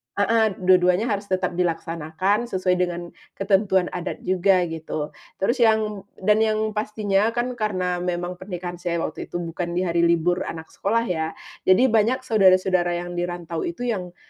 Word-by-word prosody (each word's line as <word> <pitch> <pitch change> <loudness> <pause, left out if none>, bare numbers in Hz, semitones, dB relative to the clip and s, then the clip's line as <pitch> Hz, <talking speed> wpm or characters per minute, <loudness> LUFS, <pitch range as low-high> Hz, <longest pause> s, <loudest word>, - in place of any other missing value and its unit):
heeh, 220 0 +2
dua 185 0 +6
duanya 180 +6 +2
harus 200 0 -2
tetap 185 -2 -1
dilaksanakan, 170 +5 -1
sesuai 185 -4 0
dengan 175 -1 -2 0.2
ketentuan 195 -2 +2
adat 175 - -5
juga, 185 0 +3
gitu. 160 -2 -4 0.2
Terus 235 +7 0
yang 215 -3 +2
dan 210 +3 +2
yang 215 0 +1
pastinya 210 0 0
kan 245 +1 0
karena 185 -4 -1
memang 180 0 -3
pernikahan 175 -2 -6
saya 175 -1 -2
waktu 155 - -5
itu 175 - -4
bukan 170 +1 -4
di 180 - +1
hari 170 -1 0
libur 170 +1 +2
anak 160 -1 -7
sekolah 230 +4 0
ya, 160 -6 -2 0.3
jadi 230 +7 +5
banyak 230 +4 +2
saudara-saudara 185 -5 +3
yang 175 0 -4
dirantau 175 -1 -3
itu 170 +8 -5
yang 180 -4 -5
185 Hz, 160 wpm, -23 LUFS, 175-210 Hz, 0.3 s, dua